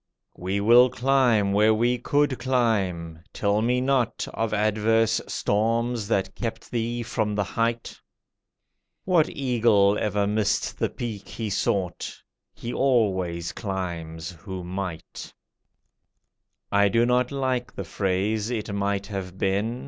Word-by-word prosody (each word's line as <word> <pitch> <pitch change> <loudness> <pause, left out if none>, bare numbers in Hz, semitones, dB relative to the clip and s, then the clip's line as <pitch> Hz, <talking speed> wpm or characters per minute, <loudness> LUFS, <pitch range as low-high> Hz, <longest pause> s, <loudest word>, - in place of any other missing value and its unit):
We 95 +3 -2
will 120 +5 +6
climb 125 -6 +2
where 105 +2 +4
we 120 +2 +1
could 145 +1 +1
climb. 100 -11 0
Tell 100 +1 +1
me 125 +2 +2
not 130 -3 0
Of 115 -2 -1
adverse 110 +2 +2
storms 115 +1 0
that 100 -3 0
kept 115 -2 -5
thee 120 0 -2
from 110 -2 -1
the 100 - +1
height. 115 +3 -2 1.0
What 175 -4 +3
eagle 115 -6 +2
ever 105 -1 0
missed 105 0 0
the - - +1
peak 105 -5 -6
he 110 -3 -5
sought? 95 -2 -1 0.4
He 120 +1 -6
always 95 -10 +1
climbs 85 -5 -5
who 90 +2 -8
might. 90 -2 -6 1.4
I 100 0 +4
do 115 +4 +3
not 125 +1 +2
like 130 -3 -1
the - - -4
phrase, 100 +3 -1
"It 110 -4 -3
might 100 0 -1
have 95 -3 -6
been!" 100 +6 0
110 Hz, 125 wpm, -25 LUFS, 100-120 Hz, 1.4 s, will